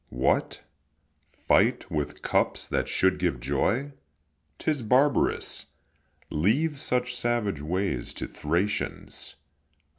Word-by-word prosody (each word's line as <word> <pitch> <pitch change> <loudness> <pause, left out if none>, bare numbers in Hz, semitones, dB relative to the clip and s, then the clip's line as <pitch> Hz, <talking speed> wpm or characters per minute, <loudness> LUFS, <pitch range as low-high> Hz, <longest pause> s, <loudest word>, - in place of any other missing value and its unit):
What, 60 +2 0 0.7
fight - - +2
with 75 -2 -3
cups - - +1
that - - 0
should 95 0 +2
give 85 -9 0
joy? 95 - 0 0.7
'Tis 150 -4 -1
barbarous; 130 +6 +2 0.6
leave 140 - +1
such 125 -1 0
savage 120 -9 0
ways 85 -5 -1
To - - -3
Thracians. 85 +7 -2
100 Hz, 95 wpm, -27 LUFS, 75-125 Hz, 0.7 s, fight